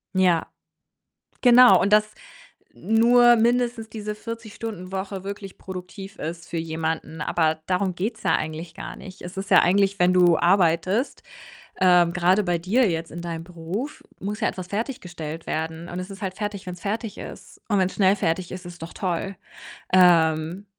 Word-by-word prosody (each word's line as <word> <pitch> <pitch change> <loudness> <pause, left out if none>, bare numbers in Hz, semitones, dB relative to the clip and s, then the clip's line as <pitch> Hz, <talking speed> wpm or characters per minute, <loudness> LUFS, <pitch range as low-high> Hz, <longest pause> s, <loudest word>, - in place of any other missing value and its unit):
Ja, 180 -3 +3 0.9
genau 245 0 +7
und 200 - +1
dass 215 0 +4 0.6
nur 240 +2 +5
mindestens 235 0 +1
diese 210 -1 -6
40- 230 0 -8
Stunden-Woche 190 -2 -5
wirklich 200 -1 -8
produktiv 190 +1 -9
ist 165 +1 -6
für 170 - -4
jemanden, 160 -1 -3
aber 160 0 0
darum 185 0 0
geht's 215 +5 -4
ja - - +3
eigentlich 160 +2 -5
gar - - -8
nicht. 190 0 -12
Es 180 +2 -9
ist 195 +1 -5
ja 185 - +8
eigentlich, 195 +2 +2
wenn 180 0 +4
du 175 -2 +5
arbeitest 185 - +2 0.6
ähm, 180 -2 +5
grade 185 +3 +2
bei 175 -2 0
dir 210 +8 +2
jetzt 165 -1 -3
in 170 - -7
deinem 165 -1 -5
Beruf 180 - -6 0.2
muss 205 +2 -4
ja - - +1
etwas 180 -1 -6
fertiggestellt 180 - -5
werden 160 +2 -3
und 175 - -6
es 185 +2 -6
ist 195 +2 -10
halt 190 -1 -3
fertig, 205 -2 -4
wenn's 180 -1 -7
fertig 215 +2 -4
ist - - -10
und 205 - +2
wenn's 185 0 +1
schnell 195 -1 +4
fertig 175 -1 -2
ist, 185 0 -7
ist 175 -2 -11
doch 165 - -7
toll. 190 +1 -3 0.6
Ähm 170 0 +4
185 Hz, 165 wpm, -24 LUFS, 170-210 Hz, 0.9 s, ja